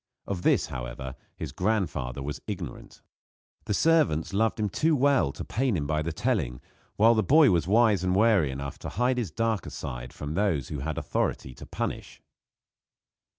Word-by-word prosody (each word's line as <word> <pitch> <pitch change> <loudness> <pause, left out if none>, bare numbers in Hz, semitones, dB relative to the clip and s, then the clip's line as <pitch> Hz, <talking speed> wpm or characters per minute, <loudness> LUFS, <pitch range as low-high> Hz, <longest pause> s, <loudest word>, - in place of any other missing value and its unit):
Of 95 -3 -3
this, - - +3
however, 65 +2 -6 0.2
his - - -6
grandfather 90 - -1
was 75 +1 -5
ignorant. 90 - -7 0.6
The - - -1
servants 145 - +2
loved 110 +2 +1
him 105 - +1
too 155 - +1
well 140 - +3
to - - -7
pain 125 -4 0
him 75 - -2
by 75 +1 0
the 80 +2 -2
telling, 90 - -1 0.4
while 115 +3 +5
the 110 - +2
boy 145 - +5
was 85 -2 +1
wise 105 -3 +4
and 90 0 +1
wary 100 -7 +4
enough 70 +1 -6
to - - -6
hide 125 +1 +1
his 110 -7 -2
darker 115 +4 -1
side - - -6
from 75 +1 -6
those 85 -8 0
who 75 - -4
had 75 +2 -3
authority 65 - -2
to - - -12
punish. - - -5
95 Hz, 175 wpm, -27 LUFS, 70-115 Hz, 0.6 s, while